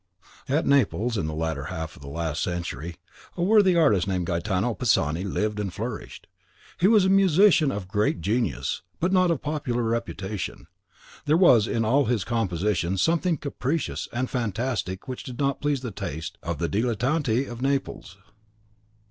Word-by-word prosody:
At 145 +4 +1
Naples, 125 -4 +2
in 95 -7 -1
the 80 - -4
latter 80 -3 -2
half 80 -1 -5
of - - -16
the 70 - -10
last 80 +1 -3
century, 85 -2 -4 0.4
a 175 - 0
worthy 200 -2 +5
artist 125 - +3
named 90 -2 -1
Gaetano 95 +6 -1
Pisani 85 - +1
lived 105 +2 -2
and 100 -3 -2
flourished. 110 +4 -6 0.5
He 180 - +4
was 210 -3 +5
a - - +3
musician 190 -5 +5
of 100 -5 -5
great 105 -2 0
genius, 110 +8 -1 0.2
but 175 +3 +1
not 185 -1 +4
of 165 -5 -1
popular 140 -6 -2
reputation; 110 -4 -3 0.6
there 150 +2 +3
was 120 - +6
in 115 -1 0
all 135 +5 +3
his 115 -4 0
compositions 95 -4 -1
something 165 - +2
capricious 140 +2 -3
and 125 +2 -1
fantastic 115 -5 -3
which 130 -1 -5
did 125 -2 -8
not 140 -1 0
please 145 -3 0
the 125 -3 -5
taste 80 -7 -6
of 85 -2 -3
the 85 - -1
Dilettanti 120 - 0
of 120 -1 -8
Naples. 135 - -2
115 Hz, 165 wpm, -25 LUFS, 90-140 Hz, 0.6 s, was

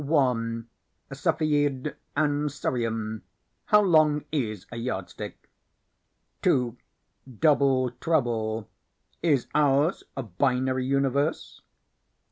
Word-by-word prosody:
Cepheid 145 -2 0 0.2
and 150 0 +1
Cerium 115 -5 -2 0.4
How 210 0 +5
Long 155 -5 +4
Is 110 - -2
a 120 - -6
Yardstick? 115 -6 -5 0.9
2. 125 -2 +2 0.6
Double 135 -4 +3
Trouble 115 -7 -1 0.5
Is 145 -7 +2
Ours 145 +3 +3
a 135 - -2
Binary 130 +5 0
Universe? 140 +2 0
135 Hz, 80 wpm, -26 LUFS, 120-150 Hz, 0.9 s, How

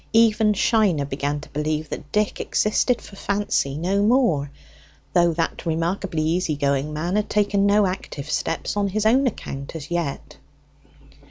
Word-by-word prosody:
Even 220 -1 +4
Shiner 200 - +2
began 145 +1 -2
to - - -12
believe 150 +1 -2
that 145 - -7
Dick 210 -1 0
existed 225 +3 +1
for 200 - -12
Fancy 195 -9 -1
no 190 +5 0
more, 205 - +2 0.6
though 175 -1 +4
that 165 0 -2
remarkably 165 0 -1
easy 165 0 0
going 140 +1 0
man 170 +5 -2
had 210 - -1
taken 200 -1 +2
no 205 0 +4
active 185 -6 -4
steps 155 - -2
on 205 -1 +1
his 210 +2 -1
own 260 +5 +4
account 140 - -5
as 160 0 -7
yet. 170 -5 -3
175 Hz, 155 wpm, -23 LUFS, 150-210 Hz, 0.6 s, Even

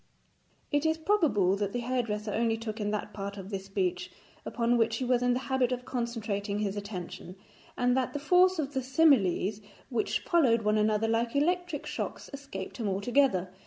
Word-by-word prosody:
It 290 -1 +2
is 320 0 +2
probable 315 - +2
that 200 -1 -2
the 245 - -1
hairdresser 225 -4 -2
only 225 0 +1
took 225 0 -5
in 205 - -1
that 210 0 -3
part 200 0 -5
of 195 +1 -8
this 195 -1 -4
speech 195 -2 -2 0.4
upon 235 0 +1
which 225 -1 +2
he 255 - -2
was 250 -1 +2
in 245 0 +3
the 250 - -1
habit 265 -2 +1
of 250 0 -3
concentrating 220 -5 -3
his 205 -1 -1
attention, 185 -3 -7 0.4
and 245 0 +2
that 260 -1 0
the - - -2
force 360 +5 +4
of 290 -2 -2
the 265 - 0
similes 245 - +3 0.3
which 240 -3 -1
followed 250 -10 +3
one 210 0 +2
another 215 +1 +2
like 230 +2 0
electric 345 +1 0
shocks - - -5
escaped 275 -9 -7
him 225 -5 -2
altogether. 200 -2 +1
230 Hz, 185 wpm, -29 LUFS, 205-265 Hz, 0.4 s, force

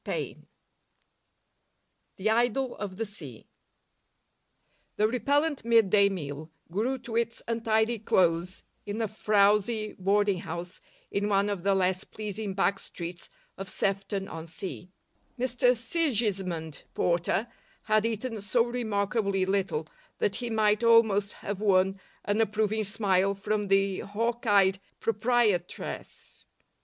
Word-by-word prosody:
AN - - -5 1.7
IDYLL 240 +5 +1
OF 195 -3 -5
THE 225 - -1
SEA 150 - -10 1.5
The 215 - +3
repellent 285 +6 +1
mid 225 -4 +4
day 200 -1 +5
meal 155 -4 -5 0.2
grew 230 +9 0
to 240 -2 -8
its 230 0 -1
untidy 225 0 +1
close 180 -3 +1 0.2
in 205 +2 -3
a 225 - 0
frowsy 210 +1 +2
boarding 200 0 +2
house 175 +3 -6 0.3
in 205 +1 0
one 200 0 +2
of 200 -3 -3
the 195 +1 +2
less 185 -1 +1
pleasing 210 -2 -5
back 195 0 +1
streets 170 0 -8 0.3
of 195 0 -4
Sefton 195 0 -2
on 165 -2 -7
Sea. 180 +1 -6 0.5
Mr 250 0 +2
Sigismund 205 - -1
Porter 175 +5 +1 0.4
had 215 -1 +2
eaten 225 0 -2
so 230 +4 +2
remarkably 210 -4 0
little 190 -5 0 0.3
that 200 - 0
he 240 -1 -3
might 215 0 +2
almost 220 -3 +4
have 205 0 -5
won 195 -1 +3 0.3
an 205 +2 +1
approving 215 0 +1
smile 200 -1 +2
from 205 +1 -1
the 195 -1 +2
hawk 230 +4 -2
eyed 195 -2 +4 0.2
proprietress. 220 -5 -1
205 Hz, 120 wpm, -28 LUFS, 190-225 Hz, 1.7 s, day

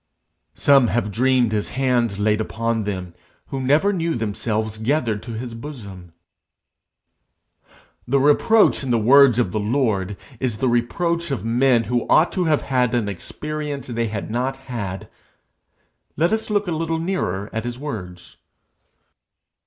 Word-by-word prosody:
Some 135 -3 +5
have 110 -2 -1
dreamed 125 +1 +2
his 105 -1 -1
hand 120 -6 +1
laid 105 +1 +1
upon 115 0 -2
them, 95 -4 -4 0.4
who 135 - -3
never 150 +10 +3
knew 165 -3 -1
themselves 110 -1 -2
gathered 115 -3 0
to 120 - -8
his 115 +1 -6
bosom. 100 - -9 1.9
The 135 +3 +2
reproach 150 +11 +4
in 135 - -4
the 120 - +3
words 125 +2 +6
of 120 -7 +1
the 110 - -1
Lord 105 -4 0 0.2
is 125 -5 -2
the 130 - 0
reproach 170 +8 0
of 135 -5 -3
men 120 +1 +3
who 120 +2 -1
ought 165 - +5
to 180 -2 -1
have 155 -2 +2
had 125 -3 +1
an 115 -4 0
experience 145 - -5
they 115 -2 -2
had 105 0 -5
not 130 +3 -1
had. 115 -8 -6 1.1
Let 170 +6 +2
us 220 0 -2
look 205 -2 0
a - - -1
little 165 0 -1
nearer 160 - -2
at 110 - -2
his 120 0 -5
words. 90 - -7
120 Hz, 150 wpm, -21 LUFS, 110-140 Hz, 1.9 s, words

